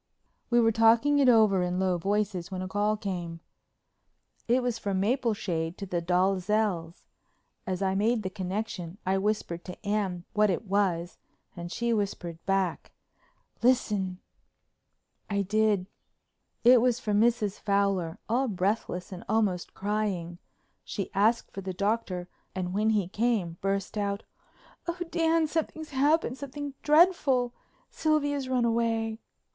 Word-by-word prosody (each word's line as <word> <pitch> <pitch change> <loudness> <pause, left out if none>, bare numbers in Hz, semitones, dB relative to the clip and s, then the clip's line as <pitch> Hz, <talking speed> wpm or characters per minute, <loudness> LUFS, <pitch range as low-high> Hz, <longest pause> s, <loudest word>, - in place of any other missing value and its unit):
We 240 0 +4
were 225 -1 +4
talking 230 +6 +4
it 270 -2 +5
over 215 -5 +5
in 180 0 -1
low 185 -2 +1
voices 200 -1 -1
when 185 -1 -4
a - - -4
call 205 +2 0
came. 175 -5 -4 1.1
It 245 +2 +3
was 240 -2 -1
from 195 -3 -1
Mapleshade 200 -7 -1
to 200 - -5
the 180 -2 -2
Dalzells'. 185 0 0 0.6
As 185 0 -1
I 190 0 +1
made 215 +3 +1
the 185 - -3
connection 185 -2 -4
I 190 +1 +2
whispered 195 -4 -2
to 180 +3 -10
Anne 195 -4 -1
what 210 -1 +3
it 190 +4 -1
was 185 -3 0 0.4
and 175 -1 -7
she 235 +2 0
whispered 175 -6 -3
back, 195 -3 0 0.7
"Listen." 210 -7 +2 1.1
I 200 -1 0
did. 210 -1 +2 0.8
It 245 0 +7
was 250 -1 +2
from 210 -4 +1
Mrs. 220 -4 +1
Fowler, 200 -5 0
all 250 +4 +1
breathless 190 -2 -2
and 180 -2 -7
almost 205 -5 0
crying. 195 -4 -2 0.4
She 200 -4 -5
asked 220 +4 +2
for 195 - -5
the 190 0 -4
Doctor 200 -2 -1 0.3
and 180 -1 -3
when 215 +2 +2
he 210 -5 +1
came 205 -5 0
burst 195 +1 -1
out: 200 0 -2 0.6
"Oh, 340 +1 -2
Dan, 330 -1 +2
something's 315 0 -3
happened—something 285 0 0
dreadful. 295 -6 +4 0.4
Sylvia's 290 -4 0
run 250 -2 +2
away." 225 -1 0
205 Hz, 135 wpm, -28 LUFS, 185-235 Hz, 1.1 s, It